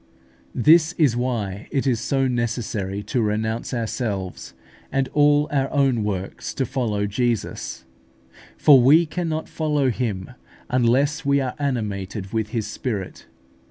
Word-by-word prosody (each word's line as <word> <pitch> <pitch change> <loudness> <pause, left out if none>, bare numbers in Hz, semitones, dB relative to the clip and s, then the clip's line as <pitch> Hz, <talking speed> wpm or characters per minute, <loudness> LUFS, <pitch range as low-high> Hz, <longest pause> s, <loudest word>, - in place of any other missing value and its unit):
This 160 +5 +5
is 145 -9 +2
why 115 -5 -2
it 135 - -1
is 125 -4 +1
so 135 +1 0
necessary 110 -5 -2
to 125 +2 -1
renounce 110 +1 -1
ourselves 110 -6 -4 0.4
and 135 -1 +1
all 145 0 +3
our 135 -2 +1
own 135 -6 +2
works 100 -2 -4
to 135 - 0
follow 110 -5 -1
Jesus; 110 - -2 0.7
for 140 -4 +7
we 150 +7 +6
cannot 160 -1 -3
follow 150 -4 0
Him 110 -4 -3 0.4
unless 130 +6 +2
we 140 0 +3
are 130 -2 -2
animated 105 -7 -3
with 110 -2 -1
His 110 -2 -2
Spirit. 105 -8 -5
125 Hz, 130 wpm, -23 LUFS, 105-140 Hz, 0.7 s, for